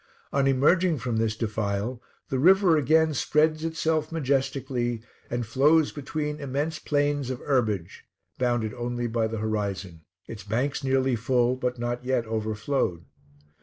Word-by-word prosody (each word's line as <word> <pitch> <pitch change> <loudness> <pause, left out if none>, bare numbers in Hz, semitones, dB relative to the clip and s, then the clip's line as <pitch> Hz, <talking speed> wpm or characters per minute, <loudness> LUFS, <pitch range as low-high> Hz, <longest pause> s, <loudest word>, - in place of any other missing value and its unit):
On 140 -1 +2
emerging 155 +6 +3
from 120 -3 -2
this 110 -1 0
defile, 110 +2 -2 0.3
the 130 - -1
river 185 +2 +5
again 155 +2 +3
spreads 155 +3 +2
itself 160 -1 -1
majestically, 130 -5 -1 0.3
and 120 0 -2
flows 145 +7 +3
between 150 +1 -4
immense 145 +3 -2
plains 145 -2 0
of 130 - -2
herbage, 110 - -1 0.4
bounded 120 -4 0
only 120 0 -3
by 115 -1 0
the 115 0 -4
horizon: 100 -5 -3 0.3
its 105 -3 -8
banks 125 +8 -1
nearly 130 -1 +2
full, 125 +1 +1
but 125 -1 -2
not 120 +1 -3
yet 125 -2 0
overflowed. 110 - -2
125 Hz, 135 wpm, -26 LUFS, 115-145 Hz, 0.4 s, river